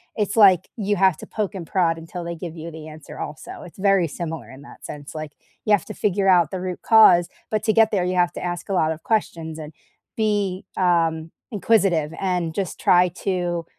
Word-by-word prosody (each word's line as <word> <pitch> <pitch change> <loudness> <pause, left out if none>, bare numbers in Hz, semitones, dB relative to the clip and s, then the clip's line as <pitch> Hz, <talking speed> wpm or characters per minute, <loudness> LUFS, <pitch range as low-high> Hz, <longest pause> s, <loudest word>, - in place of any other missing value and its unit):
it's 210 -1 -1
like 190 -5 +6
you 205 -1 0
have 190 -3 +3
to - - -11
poke 210 -2 -3
and 175 -3 -6
prod 170 -3 +1
until 165 +2 -7
they 170 0 -5
give 170 0 -7
you 165 +1 -7
the 155 0 -10
answer 155 0 -11
also, 150 +1 -7
it's 175 - -14
very 195 -3 +3
similar 160 -2 -6
in 130 +1 -12
that - - -14
sense, 145 +1 -9
like, 155 -1 -6 0.3
you 215 - 0
have 205 - +2
to 215 - -7
figure 200 -1 0
out 175 -5 +4
the 185 -1 -4
root 185 -1 -5
cause. 215 -6 +6 0.2
But 215 -1 -1
to 220 -1 +2
get 225 -1 +5
there, 185 -3 +1
you 180 0 -1
have 175 -1 +2
to - - -7
ask 175 +1 -4
a - - -1
lot 160 -4 +2
of 160 0 -6
questions 165 -8 -2
and 155 0 -9 0.4
be, 205 -4 -1
um, 165 -3 +1 0.2
inquisitive 195 -8 +2
and 180 -4 -1
just 195 -3 -3
try 180 0 +4
to 175 -2 -3
180 Hz, 220 wpm, -22 LUFS, 165-195 Hz, 0.4 s, like